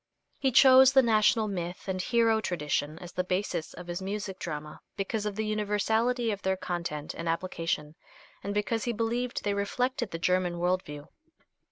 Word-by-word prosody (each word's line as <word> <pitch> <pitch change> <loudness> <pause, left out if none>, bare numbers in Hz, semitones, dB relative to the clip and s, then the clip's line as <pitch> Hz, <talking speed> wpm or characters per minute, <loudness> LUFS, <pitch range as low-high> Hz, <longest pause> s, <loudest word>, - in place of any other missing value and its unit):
He 265 - +2
chose 265 +1 +8
the 265 -1 +6
national 220 -1 +3
myth 180 -2 -5
and 185 -1 -1
hero 225 +1 +2
tradition 150 -4 -2
as 175 +1 -9
the 180 - -1
basis 180 -3 -2
of 180 - -9
his 175 +1 -5
music 195 -1 -4
drama 150 -2 -6 0.2
because 210 +2 -2
of 205 - -4
the 220 +1 -2
universality 220 +3 +1
of 200 -1 -4
their 190 0 0
content 170 -5 -4
and 165 0 -4
application, 165 -3 -2 0.5
and 200 - -3
because 210 +2 -1
he 240 - 0
believed 235 +2 -2
they 205 - 0
reflected 240 +4 -1
the 165 - -4
German 180 0 +1
world 180 +2 +1
view. 145 -2 -10
195 Hz, 175 wpm, -29 LUFS, 175-225 Hz, 0.5 s, chose